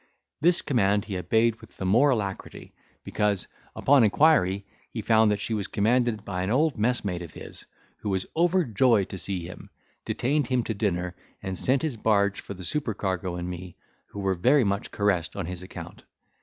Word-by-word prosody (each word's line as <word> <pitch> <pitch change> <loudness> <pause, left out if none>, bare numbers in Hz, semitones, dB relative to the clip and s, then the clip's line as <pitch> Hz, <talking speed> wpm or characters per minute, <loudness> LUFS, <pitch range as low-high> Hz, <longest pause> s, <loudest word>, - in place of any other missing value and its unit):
This 175 +2 +5
command 105 -6 +1
he 100 - -5
obeyed 110 +6 +1
with 110 - -16
the 95 - -4
more 120 +10 +4
alacrity, 100 -7 -3 0.3
because, 105 -3 -1 0.3
upon 140 -2 +4
inquiry, 100 - +3 0.2
he - - -5
found 110 -1 +4
that 105 -1 0
she 105 +3 -3
was 105 -2 -2
commanded 110 0 +1
by 90 -2 -3
an 95 - -2
old 145 +5 +2
messmate 105 -5 0
of 85 -3 -9
his, - - -10 0.3
who 105 - -5
was 95 -1 -1
overjoyed 130 - +3
to 95 - -6
see 90 -3 -2
him, 90 - -10 0.3
detained 140 +1 0
him 125 -1 +1
to 115 - -3
dinner, 90 -4 -2 0.3
and 95 0 -3
sent 130 - +1
his 150 -7 -2
barge 100 -2 +1
for 100 - -8
the 90 -1 -9
supercargo 95 - -2
and 90 0 -4
me, 90 0 -7 0.3
who 100 - -9
were 95 -1 +1
very 125 +10 +3
much 100 -1 -1
caressed 95 -6 0
on 100 - -3
his 90 +1 -6
account. 90 - -10
105 Hz, 185 wpm, -26 LUFS, 95-120 Hz, 0.3 s, This